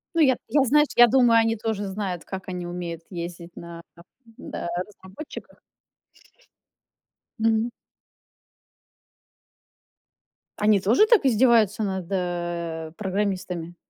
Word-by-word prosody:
Ну, 330 Hz, -, +3 dB
я 265 Hz, -4 st, +5 dB
т -, -, -22 dB
я, 285 Hz, -2 st, +3 dB
знаешь, 295 Hz, +3 st, +4 dB
я 240 Hz, 0 st, +8 dB
думаю, 235 Hz, -2 st, +5 dB
они 225 Hz, 0 st, 0 dB
тоже 210 Hz, -2 st, -3 dB
знают, 190 Hz, -3 st, -4 dB
как 190 Hz, -1 st, -7 dB
они 180 Hz, -1 st, -5 dB
умеют 175 Hz, -1 st, -5 dB
ездить 170 Hz, -1 st, -7 dB
на 170 Hz, 0 st, -9 dB, 0.6 s
да, -, -, -7 dB
на -, -, -4 dB, 0.2 s
разработчиках. 200 Hz, +8 st, -11 dB, 1.8 s
Мгм. 225 Hz, +1 st, +2 dB, 2.9 s
Они 210 Hz, -1 st, +3 dB
тоже 225 Hz, -, +4 dB
так 435 Hz, -, +4 dB
издеваются 225 Hz, -4 st, +3 dB
над, 190 Hz, -3 st, -3 dB
э, 175 Hz, -3 st, -3 dB
программистами? 185 Hz, -4 st, -3 dB
195 Hz, 110 wpm, -24 LUFS, 175-230 Hz, 2.9 s, я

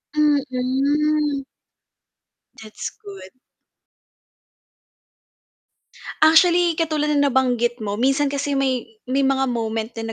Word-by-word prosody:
Mm. 290 Hz, +1 st, 0 dB, 1.2 s
That's 215 Hz, -1 st, -7 dB, 0.2 s
good. 195 Hz, -2 st, -10 dB, 2.9 s
Actually, 340 Hz, +1 st, +5 dB
katulad 305 Hz, -2 st, -1 dB
ng 285 Hz, -1 st, +2 dB
nabanggit 245 Hz, -2 st, 0 dB
mo, 205 Hz, -1 st, -3 dB
minsan 270 Hz, +4 st, +1 dB
kasi 285 Hz, +1 st, -3 dB
may 265 Hz, -3 st, 0 dB, 0.2 s
may 275 Hz, +2 st, +1 dB
mga 270 Hz, 0 st, +1 dB
moment 225 Hz, -2 st, -3 dB
din 225 Hz, -, -4 dB
275 Hz, 90 wpm, -21 LUFS, 245-300 Hz, 2.9 s, Actually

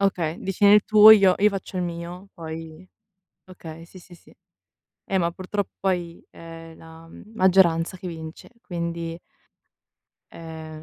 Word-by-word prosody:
Okay, 175 Hz, -5 st, -1 dB
dici: 195 Hz, -1 st, -5 dB
"Nel 205 Hz, +1 st, +7 dB
tuo 215 Hz, 0 st, +8 dB
io 200 Hz, -4 st, +6 dB
io 210 Hz, -, +4 dB
faccio 195 Hz, -2 st, -7 dB
il 180 Hz, -, -1 dB
mio, 175 Hz, +2 st, -7 dB
poi" 160 Hz, +1 st, -9 dB, 0.6 s
okay, 165 Hz, -2 st, -11 dB
sì, 185 Hz, -, -15 dB
sì, 175 Hz, 0 st, -16 dB
sì. -, -, -21 dB, 0.7 s
Eh, 195 Hz, -, -1 dB
ma 170 Hz, -2 st, 0 dB
purtroppo 185 Hz, +3 st, -3 dB, 0.2 s
poi 175 Hz, -3 st, -3 dB
è 165 Hz, 0 st, -12 dB
la, 165 Hz, 0 st, -15 dB
mhmm, 210 Hz, +6 st, -15 dB
maggioranza 185 Hz, -3 st, +2 dB
che 185 Hz, -, -10 dB
vince, 160 Hz, -1 st, -10 dB
quindi 170 Hz, -1 st, -5 dB, 1.1 s
è 160 Hz, -1 st, -10 dB
170 Hz, 145 wpm, -23 LUFS, 165-190 Hz, 1.1 s, tuo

